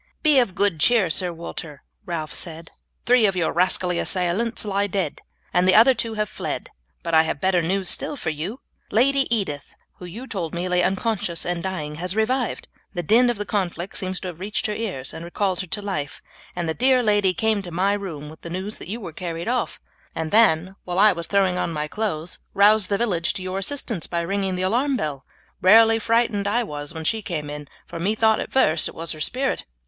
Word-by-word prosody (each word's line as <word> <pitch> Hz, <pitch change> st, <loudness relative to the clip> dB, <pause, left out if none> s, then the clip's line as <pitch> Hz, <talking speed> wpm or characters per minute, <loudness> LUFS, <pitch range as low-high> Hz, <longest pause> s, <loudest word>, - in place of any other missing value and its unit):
"Be 300 Hz, -4 st, +6 dB
of 210 Hz, -7 st, +1 dB
good 200 Hz, -6 st, +1 dB
cheer, 205 Hz, -1 st, +4 dB
Sir 180 Hz, +3 st, +1 dB
Walter," 165 Hz, -3 st, -8 dB, 0.2 s
Ralph 160 Hz, -3 st, -4 dB
said; 165 Hz, -1 st, -8 dB, 0.3 s
"three 245 Hz, -3 st, +5 dB
of 195 Hz, -, -1 dB
your 175 Hz, -3 st, +1 dB
rascally 180 Hz, 0 st, +2 dB
assailants 195 Hz, +6 st, -1 dB
lie 200 Hz, 0 st, 0 dB
dead, 195 Hz, -1 st, -2 dB, 0.3 s
and 180 Hz, +1 st, +3 dB
the 185 Hz, -, +6 dB
other 235 Hz, +5 st, +8 dB
two 230 Hz, -2 st, -2 dB
have 210 Hz, 0 st, 0 dB
fled; -, -, -5 dB, 0.3 s
but 170 Hz, -1 st, -3 dB
I 160 Hz, -, +7 dB
have 160 Hz, -2 st, -2 dB
better 185 Hz, +1 st, +2 dB
news 185 Hz, +3 st, 0 dB
still 295 Hz, -, 0 dB
for 165 Hz, -, -2 dB
you. 175 Hz, -, -5 dB, 0.3 s
Lady 270 Hz, +4 st, +3 dB
Edith, 190 Hz, -12 st, -2 dB, 0.2 s
who 180 Hz, -, -8 dB
you 215 Hz, +9 st, -8 dB
told 175 Hz, -10 st, -4 dB
me 175 Hz, +2 st, -2 dB
lay 180 Hz, 0 st, +2 dB
unconscious 195 Hz, -2 st, -1 dB
and 175 Hz, -1 st, -2 dB
dying, 155 Hz, -6 st, -4 dB
has 180 Hz, +2 st, -2 dB
revived. 240 Hz, +3 st, 0 dB, 0.3 s
The 175 Hz, -, -2 dB
din 240 Hz, +8 st, +4 dB
of 240 Hz, -, -1 dB
the 205 Hz, -, -3 dB
conflict 185 Hz, -3 st, -2 dB
seems 185 Hz, -1 st, -2 dB
to 185 Hz, -, -4 dB
have 170 Hz, -2 st, -10 dB
reached 205 Hz, +3 st, -2 dB
her 210 Hz, -, -1 dB
ears 190 Hz, -, -4 dB
and 160 Hz, -, -7 dB
recalled 185 Hz, +2 st, -1 dB
her 185 Hz, -, -4 dB
to 205 Hz, -, -2 dB
life, 150 Hz, -8 st, -4 dB, 0.4 s
and 175 Hz, -2 st, -2 dB
the 160 Hz, -, 0 dB
dear 255 Hz, +4 st, +3 dB
lady 205 Hz, -4 st, +3 dB
came 220 Hz, +1 st, +1 dB
to 185 Hz, -, -8 dB
my 185 Hz, +4 st, +1 dB
room 175 Hz, -8 st, -5 dB
with 155 Hz, +2 st, -12 dB
the 170 Hz, -, -8 dB
news 190 Hz, +5 st, -5 dB
that -, -, -9 dB
you 225 Hz, +4 st, -4 dB
were 180 Hz, -7 st, -8 dB
carried 170 Hz, +1 st, -5 dB
off, 245 Hz, 0 st, -1 dB, 0.4 s
and 160 Hz, -1 st, -3 dB
then, 190 Hz, -4 st, +4 dB
while 180 Hz, 0 st, -4 dB
I 210 Hz, +2 st, +7 dB
was 170 Hz, -3 st, -5 dB
throwing 190 Hz, -3 st, +2 dB
on 170 Hz, -, -1 dB
my 150 Hz, -1 st, -2 dB
clothes, 175 Hz, -4 st, -3 dB, 0.2 s
roused 205 Hz, 0 st, +5 dB
the 200 Hz, -, +2 dB
village 185 Hz, -8 st, 0 dB
to 185 Hz, -, -5 dB
your 185 Hz, +1 st, -3 dB
assistance 225 Hz, -, -1 dB
by 170 Hz, -1 st, -1 dB
ringing 190 Hz, +2 st, -1 dB
the 180 Hz, -, -2 dB
alarm 255 Hz, +8 st, +1 dB
bell. 145 Hz, -, -4 dB, 0.4 s
Rarely 225 Hz, +4 st, +7 dB
frightened 230 Hz, -3 st, +1 dB
I 235 Hz, +4 st, +2 dB
was 145 Hz, -7 st, -6 dB
when 160 Hz, -1 st, -6 dB
she 220 Hz, +7 st, 0 dB
came 150 Hz, -7 st, -4 dB
in, 150 Hz, 0 st, -7 dB, 0.2 s
for 170 Hz, -, -8 dB
methought 220 Hz, +4 st, +2 dB
at -, -, -5 dB
first 160 Hz, -11 st, +3 dB
it -, -, -13 dB
was 165 Hz, 0 st, -4 dB
her 155 Hz, -, -7 dB
spirit." 265 Hz, -, -1 dB
190 Hz, 220 wpm, -23 LUFS, 170-220 Hz, 0.4 s, other